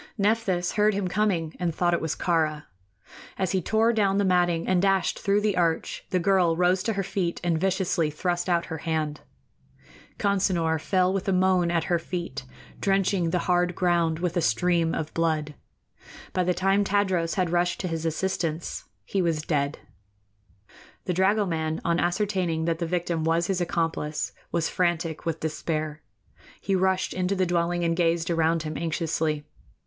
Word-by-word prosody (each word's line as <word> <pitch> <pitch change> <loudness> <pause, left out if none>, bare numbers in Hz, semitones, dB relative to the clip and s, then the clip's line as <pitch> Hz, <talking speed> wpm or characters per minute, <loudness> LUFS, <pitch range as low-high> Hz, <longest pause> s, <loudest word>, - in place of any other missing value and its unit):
Nephthys 200 -4 +1
heard 210 -1 +2
him 200 -2 -1
coming 180 -5 0
and 170 -3 -1
thought 175 -1 +2
it 170 - +1
was 160 - -2
Kāra. 155 -3 0 0.7
As 190 -2 0
he 190 - +1
tore 220 +6 +2
down 200 -3 +2
the 200 - +2
matting 175 -2 +2
and 185 -1 +3
dashed 195 -1 +1
through 200 +1 +2
the 205 -2 +1
arch, 170 -2 -1
the 185 - +1
girl 180 -2 +2
rose 180 +1 +3
to 225 +3 -1
her 195 -1 -1
feet 180 -2 -2
and 170 -2 +1
viciously 185 -4 +1
thrust 175 +4 -2
out 170 -1 +2
her 160 -1 -6
hand. 155 -2 -2 1.0
Consinor 180 -6 +1
fell 185 +1 +2
with 195 -1 -2
a - - +2
moan 185 -1 +3
at 170 -1 +1
her 175 -2 +1
feet, 170 -6 -5 0.3
drenching 195 -3 +1
the 175 +1 -1
hard 180 -1 +2
ground 170 -3 +1
with 175 0 -2
a 175 - +2
stream 165 +7 +1
of 155 -1 -4
blood. 155 -3 0 0.8
By 185 -1 +1
the 180 0 +1
time 195 +2 +2
Tadros 190 -4 +1
had 180 -3 0
rushed 175 0 +1
to 185 - -2
his 165 -2 -3
assistance 165 -1 -2 0.2
he 195 - -1
was 165 -3 0
dead. 145 -2 -1 1.3
The 180 - 0
dragoman, 180 -4 +1
on 170 0 +2
ascertaining 175 -3 0
that 165 -1 0
the 170 - -1
victim 170 -1 -1
was 165 +1 +2
his 185 0 -1
accomplice, 165 -3 -1 0.2
was 165 -2 0
frantic 170 -2 -1
with 165 -1 -2
despair. 155 -1 -3 0.6
He 195 - -2
rushed 190 0 +1
into 185 +2 0
the 185 -1 +1
dwelling 175 0 0
and 165 0 +1
gazed 170 -1 +1
around 165 0 +1
him 155 -1 -5
anxiously. 160 -2 -1
175 Hz, 170 wpm, -26 LUFS, 165-190 Hz, 1.3 s, and